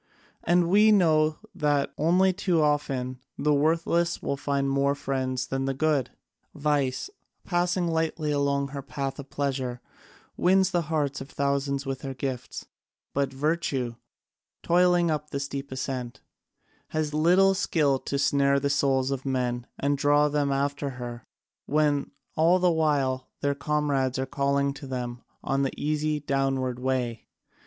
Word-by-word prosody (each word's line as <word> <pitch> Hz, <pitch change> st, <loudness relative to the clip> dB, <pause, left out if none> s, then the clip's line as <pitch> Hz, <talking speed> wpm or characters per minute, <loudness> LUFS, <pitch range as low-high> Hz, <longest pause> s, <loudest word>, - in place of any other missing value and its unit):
And 175 Hz, 0 st, +3 dB
we 210 Hz, +4 st, +5 dB
know 155 Hz, -6 st, +4 dB, 0.2 s
that 145 Hz, -2 st, 0 dB
only 185 Hz, +4 st, +3 dB
too 180 Hz, -3 st, +1 dB
often 135 Hz, -4 st, 0 dB, 0.2 s
the 150 Hz, +1 st, +2 dB
worthless 165 Hz, +3 st, +1 dB
will -, -, -2 dB
find 140 Hz, 0 st, -1 dB
more 140 Hz, +1 st, +2 dB
friends 130 Hz, -2 st, -2 dB
than 135 Hz, +1 st, -2 dB
the 135 Hz, 0 st, -1 dB
good. 145 Hz, -3 st, +1 dB, 0.5 s
Vice, 145 Hz, -, 0 dB, 0.3 s
passing 175 Hz, 0 st, +1 dB
lightly 160 Hz, -2 st, -1 dB
along 140 Hz, -1 st, 0 dB
her 140 Hz, 0 st, -5 dB
path 135 Hz, +1 st, -4 dB
of 140 Hz, -1 st, -8 dB
pleasure, 130 Hz, -3 st, -2 dB, 0.6 s
wins 190 Hz, +1 st, +3 dB
the 175 Hz, -1 st, +2 dB
hearts 145 Hz, -4 st, -1 dB
of 135 Hz, -, -8 dB
thousands 140 Hz, 0 st, -1 dB
with 135 Hz, -1 st, -4 dB
her 135 Hz, -1 st, -5 dB
gifts; 130 Hz, -1 st, -5 dB, 0.5 s
but 140 Hz, -1 st, 0 dB
Virtue, 135 Hz, -4 st, -1 dB, 0.7 s
toiling 175 Hz, -1 st, +3 dB
up 150 Hz, 0 st, -3 dB
the 140 Hz, -, -3 dB
steep 140 Hz, 0 st, -5 dB
ascent, 130 Hz, -2 st, -4 dB, 0.7 s
has 155 Hz, -1 st, -2 dB
little 180 Hz, +5 st, +4 dB
skill 150 Hz, -7 st, +1 dB
to 140 Hz, -, -3 dB
snare 140 Hz, 0 st, +3 dB
the 140 Hz, 0 st, 0 dB
souls 135 Hz, -1 st, +1 dB
of 135 Hz, -1 st, -3 dB
men 125 Hz, -2 st, -1 dB
and 140 Hz, 0 st, 0 dB
draw 145 Hz, +1 st, +4 dB
them 145 Hz, -1 st, 0 dB
after 140 Hz, +1 st, -1 dB
her, 120 Hz, -2 st, -7 dB, 0.4 s
when 145 Hz, -1 st, +1 dB, 0.3 s
all 165 Hz, +3 st, +4 dB
the 180 Hz, -1 st, +3 dB
while 140 Hz, -5 st, +1 dB
their 140 Hz, 0 st, +1 dB
comrades 140 Hz, -2 st, 0 dB
are 130 Hz, -, -1 dB
calling 140 Hz, +1 st, 0 dB
to 140 Hz, 0 st, -9 dB
them 125 Hz, -2 st, -4 dB, 0.2 s
on 135 Hz, 0 st, 0 dB
the 135 Hz, -, 0 dB
easy 150 Hz, 0 st, 0 dB
downward 135 Hz, -3 st, -1 dB
way. 125 Hz, -3 st, -2 dB
140 Hz, 145 wpm, -26 LUFS, 135-155 Hz, 0.7 s, we